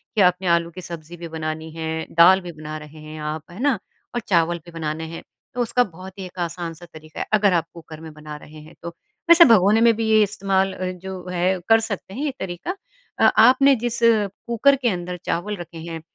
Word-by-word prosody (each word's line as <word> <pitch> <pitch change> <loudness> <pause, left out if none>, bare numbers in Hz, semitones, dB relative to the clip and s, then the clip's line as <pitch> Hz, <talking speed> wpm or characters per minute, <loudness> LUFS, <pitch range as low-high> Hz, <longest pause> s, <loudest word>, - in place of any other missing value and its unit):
कि 210 - +3
आपने 180 0 +3
आलू 170 0 -1
की 185 - -9
सब्ज़ी 170 0 -9
भी 170 - -7
बनानी 160 0 -5
है, 160 0 -3
दाल 180 +3 +6
भी 175 -1 -7
बना 155 0 -7
रहे 155 0 -12
हैं 155 0 -9
आप, 150 +1 -4
है 185 - -11
ना? 275 -4 +2 0.4
और - - +1
चावल 170 -2 +2
भी 170 - -12
बनाने 160 -1 -4
हैं। 165 - -8 0.3
तो 250 - -2
उसका 245 +1 +2
बहुत 185 0 -11
ही 190 - -5
एक 180 0 -11
आसान 170 -1 -4
सा 175 +2 -13
तरीका 155 0 -11
है, - - -2
अगर 205 -3 +4
आप 165 -2 +1
कुकर 160 -2 -11
में 160 - -9
बना 150 0 -9
रहे 155 +1 -13
हैं 155 +2 -15
तो। 170 - -5 0.4
वैसे 340 0 +9
भगोने 210 +3 +4
में 230 -1 +6
भी 225 - -2
ये 215 0 +5
इस्तेमाल 195 -1 0
अ, 185 0 -3
जो 185 0 -8
है 180 +1 0
कर 225 0 +7
सकते 200 -3 -5
हैं, 275 +8 -4
ये 290 - -1
तरीका। 190 - -5 0.4
अ - - +6 0.2
आपने 275 +2 +5
जिस 240 -1 -2
कुकर 230 +4 +3
के 255 -3 0
अंदर 180 -2 -4
चावल 205 +5 -2
रखे 170 -1 -9
हैं, 165 0 -7
180 Hz, 225 wpm, -22 LUFS, 160-205 Hz, 0.4 s, वैसे